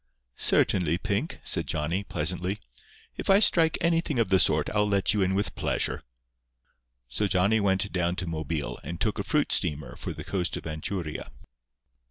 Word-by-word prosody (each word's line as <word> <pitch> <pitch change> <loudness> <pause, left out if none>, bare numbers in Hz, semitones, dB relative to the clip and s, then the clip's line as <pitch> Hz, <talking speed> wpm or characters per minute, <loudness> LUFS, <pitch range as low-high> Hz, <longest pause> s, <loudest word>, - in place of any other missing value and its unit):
"Certainly, 85 -3 +3
Pink," 105 - -2
said - - -1
Johnny, 80 +6 -1
pleasantly. 90 +3 -2 0.6
"If - - -4
I 195 +1 +7
strike 165 -6 +4
anything 165 -4 +1
of 115 -4 +2
the 95 -1 +4
sort 75 -3 +4
I'll 105 0 +2
let 100 -1 +2
you 105 - +1
in 95 0 +1
with 100 +1 -1
pleasure." - - -1 1.1
So 100 - -1
Johnny 100 +4 +2
went 100 0 +1
down 90 -1 0
to 90 - -2
Mobile 80 -2 -3
and 85 0 -6
took 105 -1 -1
a - - -1
fruit 150 +4 +1
steamer 75 -5 0
for - - -5
the - - -7
coast 90 -3 -1
of - - -9
Anchuria. 80 +1 -4
95 Hz, 170 wpm, -27 LUFS, 85-105 Hz, 1.1 s, I